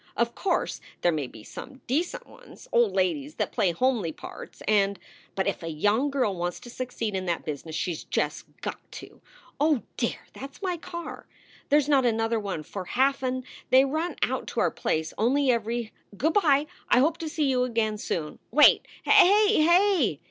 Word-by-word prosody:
Of 235 0 +1
course 370 -3 -1 0.2
there 175 - +3
may 150 -5 -2
be 110 -3 -13
some 265 - -10
decent 315 +8 -1
ones, - - -15
old 235 -5 +3
ladies 160 -6 0
that - - -2
play 200 -7 +2
homely 220 -3 0
parts - - -10
and 200 -1 +3 0.4
but 190 - 0
if - - -1
a 165 - -6
young 205 - +1
girl 255 -8 0
wants 175 0 -3
to 240 - -10
succeed 240 -4 -4
in 190 -1 -2
that 170 -1 -2
business 155 +1 -5
she 180 - -1
s 160 - -6
just - - -2 0.2
got - - -4
to - - -11 0.4
Oh 295 -4 +2
dear! - - -1
that 275 - -7
s - - -18
my 365 -2 0
car. 340 +1 -8 0.4
There 295 - +6
snot 280 -2 +3
another 225 0 +1
one 195 -7 -4
for 190 +3 -7
half 270 +7 +1
an 255 0 -2 0.3
They 260 +1 +6
run 315 +5 -2
out - - -1
to - - -3
our - - +2
place 160 0 -2
only 260 +4 +3
every 230 0 -2 0.2
Good 315 +9 +1
by. 300 -7 +4 0.2
I - - +5
hope 310 +6 +3
to 320 - -4
see 310 -1 0
you 255 -2 +2
again 225 -3 -1
soon. 155 -7 -4
Wait! 300 +5 +6 0.2
Hay! 415 0 +6
Hay!" 345 - +3
240 Hz, 190 wpm, -26 LUFS, 190-290 Hz, 0.4 s, There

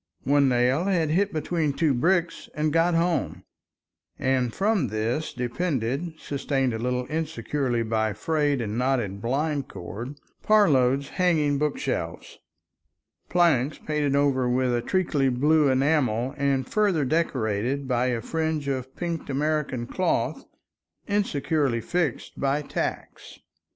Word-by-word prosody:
One 140 -1 +3
nail 125 +6 +2
had 170 -6 +1
hit 195 +5 +2
between 155 -1 -1
two 155 -1 +2
bricks 170 +6 0
and 150 0 0
got 165 +1 +3
home, 170 0 0 0.7
and 130 -2 +1
from 195 - +1
this 115 +8 -2
depended, 135 +4 -2
sustained 135 -3 -1
a 110 - -3
little 125 +1 -1
insecurely 140 -5 -2
by 110 -1 0
frayed 145 +3 0
and 110 +1 -3
knotted 120 -7 0
blind 140 +4 -1
cord, 115 +11 -7 0.3
Parload's 140 -10 +3
hanging 155 -6 +1
bookshelves, 150 -1 -3 0.9
planks 155 -6 +2
painted 150 -2 -1
over 135 -3 +2
with 125 0 +1
a 120 - +1
treacly 150 -4 +1
blue 145 +4 +3
enamel 130 -3 +1
and 140 -2 0
further 200 -9 +1
decorated 130 -3 -1
by 125 -1 +1
a 120 -2 -1
fringe 160 -1 -2
of 130 -1 -3
pinked 170 -3 -4
American 140 -3 -1
cloth 185 +9 -1 0.6
insecurely 150 - 0
fixed 165 +1 -2
by 140 +2 0
tacks. - - -5
140 Hz, 125 wpm, -25 LUFS, 125-160 Hz, 0.9 s, One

